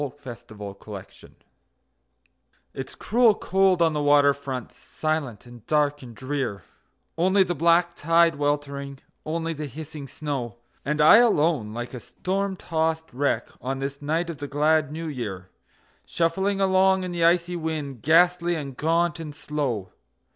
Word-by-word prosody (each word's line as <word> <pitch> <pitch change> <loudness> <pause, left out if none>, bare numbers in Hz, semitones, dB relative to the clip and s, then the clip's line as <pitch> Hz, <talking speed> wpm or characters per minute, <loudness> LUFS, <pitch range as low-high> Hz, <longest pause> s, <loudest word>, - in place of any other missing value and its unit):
New 145 -3 -2
Year's 120 -3 -8 0.8
Eve - - -14 1.4
It's 135 0 -7
cruel 230 -1 +3
cold 190 -3 +2
on 165 -1 +2
the 150 - -1
water 145 -1 +5
front, 135 -4 -6
silent 145 -9 -4
and 120 -2 -13
dark 145 -1 +1
and 120 -3 -11
drear; 130 -6 -3 0.6
Only 190 +3 +4
the 175 -1 -2
black 170 +2 +3
tide 165 +1 +3
weltering, 140 -1 -2 0.3
only 165 +1 -2
the 150 -1 -5
hissing 150 +1 -8
snow; 135 -6 -4 0.3
And 150 +1 0
I, 155 +7 +9
alone, 160 - +3
like 120 +2 -5
a 125 - -5
storm 195 - -3
tossed 160 -4 -2
wreck, 125 -3 0
on 135 +2 -3
this 140 +1 -5
night 165 +4 -1
of 155 - -10
the 145 - -5
glad 150 +1 +2
New 165 +2 -5
Year, 105 -10 -6 0.6
Shuffling 190 +4 0
along 190 0 +3
in 180 - -4
the 170 -1 -1
icy 175 +1 +3
wind, 155 -7 -4
ghastly 175 +3 +4
and 140 -4 -5
gaunt 170 +4 +1
and 155 -3 -7
slow. 130 -12 -3
155 Hz, 150 wpm, -25 LUFS, 140-170 Hz, 1.4 s, I